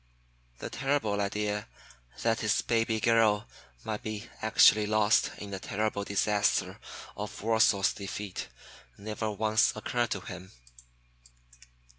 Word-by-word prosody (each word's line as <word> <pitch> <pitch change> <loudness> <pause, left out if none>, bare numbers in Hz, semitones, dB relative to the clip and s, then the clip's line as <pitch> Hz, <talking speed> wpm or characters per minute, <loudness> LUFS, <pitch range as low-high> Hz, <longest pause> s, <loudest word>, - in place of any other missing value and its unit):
The - - -7
terrible 135 -7 0
idea 105 +1 -2 0.6
that 115 -1 +2
his 110 -2 +1
baby 115 -1 +1
girl 110 -2 +3 0.4
might 105 -1 -4
be 110 +1 -5
actually 110 -1 +5
lost 110 0 +3
in 100 -1 -8
the 95 - -4
terrible 105 +1 -2
disaster 100 +1 +1 0.4
of - - -6
Warsaw's 110 -3 +3
defeat 100 0 -6 0.5
never 110 +1 -4
once 110 +1 +2
occurred 120 -1 -1
to 100 - -3
him. 95 0 -9
105 Hz, 115 wpm, -29 LUFS, 100-110 Hz, 0.6 s, actually